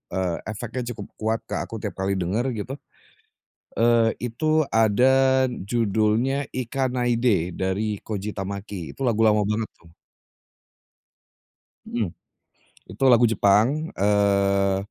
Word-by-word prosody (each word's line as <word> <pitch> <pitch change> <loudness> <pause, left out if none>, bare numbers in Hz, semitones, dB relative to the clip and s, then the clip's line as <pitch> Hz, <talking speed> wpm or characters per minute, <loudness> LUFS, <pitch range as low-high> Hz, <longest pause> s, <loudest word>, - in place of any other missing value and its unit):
eee, 90 -3 -1
efeknya 115 +3 -5
cukup 100 -3 -8 0.4
ke - - -5
aku 115 -1 -6
tiap 105 -2 -5
kali 95 +1 0
denger 95 +7 -1
gitu, 130 +7 -5 1.0
eee, 115 -1 +3 0.2
itu 155 +5 +1
ada 130 +4 +4
judulnya 115 +5 0
Ikanaide, 120 - 0
dari 100 +3 -2
Koji 105 -1 -5
Tamaki. 100 -2 -6
Itu 135 - -4
lagu 115 -3 +1
lama 105 -1 +3
banget 105 +2 -1
tuh. 85 -1 -21 1.9
Mhm, 115 -5 -2 0.9
itu - - -4
lagu 120 -1 +6
Jepang, 115 - +2
eee, 100 -1 +2
110 Hz, 110 wpm, -24 LUFS, 100-125 Hz, 1.9 s, lagu